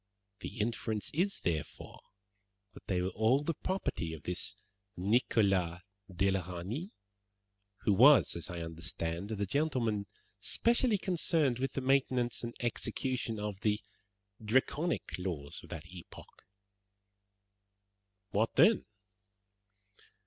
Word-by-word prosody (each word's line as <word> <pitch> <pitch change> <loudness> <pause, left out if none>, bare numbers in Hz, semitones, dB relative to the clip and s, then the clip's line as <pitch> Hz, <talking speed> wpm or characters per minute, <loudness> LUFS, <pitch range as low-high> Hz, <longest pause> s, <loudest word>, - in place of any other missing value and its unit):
The - - -7
inference 110 -1 -1
is, 185 +6 0
therefore, 80 -4 -3 0.7
that - - -14
they 90 -2 +1
were 95 - 0
all 110 +8 +2
the 165 - 0
property 140 - -2
of 80 - -13
this 90 +3 -2 0.4
Nicholas 95 -4 +2 0.3
de 95 +2 +2
la 95 - +1
Reynie, 110 - -4 0.9
who 105 - +3
was, 130 +8 +7
as 85 - -4
I 90 -1 -4
understand, 85 +3 -4
the 100 -2 -1
gentleman 115 -5 0 0.3
specially 235 -1 +2
concerned 160 -8 +1
with 135 0 -1
the 135 - -2
maintenance 130 -3 +1
and 120 0 -5
execution 120 -1 -2
of 105 -2 -4
the 105 0 +1 0.6
Draconic 130 - 0
laws 80 -6 -4
of - - -13
that 80 +1 -7
epoch." 90 0 -13 1.9
"What 110 +3 +1
then?" 220 -1 +5
110 Hz, 115 wpm, -33 LUFS, 90-135 Hz, 1.9 s, was